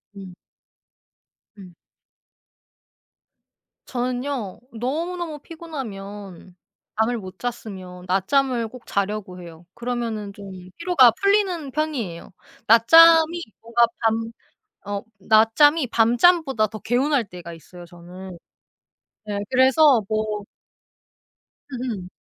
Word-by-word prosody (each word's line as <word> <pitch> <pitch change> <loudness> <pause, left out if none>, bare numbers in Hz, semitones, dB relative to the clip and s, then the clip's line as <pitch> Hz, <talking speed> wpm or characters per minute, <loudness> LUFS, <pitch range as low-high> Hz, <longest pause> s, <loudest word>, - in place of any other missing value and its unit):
음. 190 -2 -10 1.2
음. 185 -3 -13 2.1
저는요 250 -4 -3
너무너무 315 +7 -4
피곤하면 205 - -9 0.4
잠을 235 +2 +1
못 185 -3 -9
잤으면 190 -7 -7
낮잠을 235 +5 +1
꼭 250 +1 -13
자려고 200 -2 -3
해요. 170 -1 -13
그러면은 235 -4 -4
좀 200 0 -11 0.3
피로가 335 -9 +5
풀리는 395 -7 +1
편이에요. 255 - -4 0.4
낮잠이 325 +8 +6 0.2
뭔가 235 +1 +3
밤 225 0 0 0.5
어 200 0 -4 0.2
낮잠이 225 - +4
밤잠보다 245 +2 +3
더 215 +1 -8
개운할 255 +4 +1
때가 175 -2 -9
있어요, 175 +2 -13
저는. 175 +2 -11 1.0
예 205 - -2
그래서 260 0 +4
뭐 215 -1 -2 1.3
음음. 235 -7 -5
230 Hz, 205 characters per minute, -22 LUFS, 195-275 Hz, 2.1 s, 낮잠이